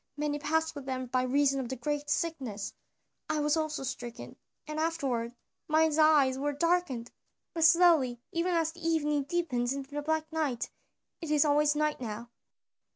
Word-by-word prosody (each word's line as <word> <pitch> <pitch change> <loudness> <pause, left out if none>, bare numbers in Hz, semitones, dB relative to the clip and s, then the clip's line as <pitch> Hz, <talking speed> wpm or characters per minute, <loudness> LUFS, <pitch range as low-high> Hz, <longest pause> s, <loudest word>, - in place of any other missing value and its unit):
"Many 295 0 -1
passed 320 +2 0
with 285 -3 -9
them 260 -1 -2
by 255 +1 0
reason 275 +2 +2
of 255 -1 -4
a - - -2
great 290 +3 -3
sickness. 270 - -2 0.6
I - - 0
also 300 +1 +2
was 300 -3 -4
stricken, 240 -1 -7 0.3
and 305 0 -4
afterward 270 -8 -1 0.3
mine 315 +1 +3
eyes 290 -4 +5
were 290 +1 -1
darkened, 290 -6 0 0.4
not 330 - +1
suddenly, 325 -7 +5
but - - -30
slowly - - -44
even 345 +1 0
as 325 -1 +1
the 340 +1 -15
evening 300 -3 +1
deepens 275 -6 -1
into 275 0 -6
the 295 +1 -3
black 315 +1 0
night. 295 -7 -2 0.5
It 325 - -5
is 300 0 +4
always 295 0 +3
night 300 -2 0
now." 235 +1 -6
295 Hz, 175 wpm, -30 LUFS, 260-315 Hz, 0.6 s, eyes